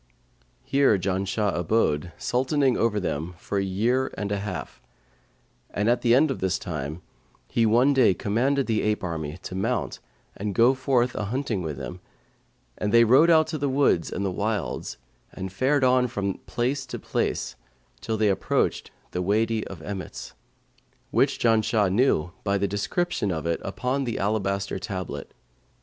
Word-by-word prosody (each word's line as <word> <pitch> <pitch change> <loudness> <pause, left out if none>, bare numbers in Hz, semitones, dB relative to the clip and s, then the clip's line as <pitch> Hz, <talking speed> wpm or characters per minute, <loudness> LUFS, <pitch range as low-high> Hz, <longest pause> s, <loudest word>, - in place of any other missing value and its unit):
Here 140 -6 +3
Janshah 95 +2 -1
abode, 85 -3 +1
Sultaning 130 +1 +1
over 110 -2 +1
them, 85 -1 -3
for 100 +3 -2
a - - 0
year 115 +8 0
and 105 -1 -3
a 100 - 0
half. 105 +1 -6 0.9
And 100 +2 -1
at 120 +1 +3
the 120 -1 +4
end 145 +2 +4
of - - -4
this 95 0 0
time, 80 -3 -5 0.5
he 115 -1 +3
one 125 +6 +4
day 125 -8 +4
commanded 130 +6 +1
the 110 -2 0
ape 105 -1 0
army 80 -3 -4
to - - -6
mount 110 +4 -1 0.4
and 100 -1 -4
go 120 +3 +5
forth 130 -2 +1
a 105 - -3
hunting 115 -2 -2
with 80 -5 -4
him, - - -6 0.8
and 105 - -1
they 115 +1 +7
rode 130 +9 +6
out 160 -1 +5
into 155 -2 -3
the 140 0 0
woods 130 - +2
and 100 -2 -2
wilds, 105 -3 -2 0.4
and 95 0 -6
fared 135 +6 +2
on 125 0 +4
from 100 -5 -3
place 130 +3 -1
to - - -5
place, 60 - -2 0.4
till 110 -1 -2
they 105 -1 +3
approached 95 - 0 0.2
the 90 - -2
Wady 110 +3 +1
of 85 -5 -9
Emmets, 95 -5 -6 0.8
which - - +2
Janshah 110 -3 +2
knew 100 - +2
by 100 0 +1
the 100 - 0
description 105 - -1
of 80 -2 -3
it 85 0 0
upon 130 +7 -2
the 120 - -2
alabaster 100 -2 -1
tablet. 95 -3 -5
105 Hz, 165 wpm, -25 LUFS, 95-125 Hz, 0.9 s, they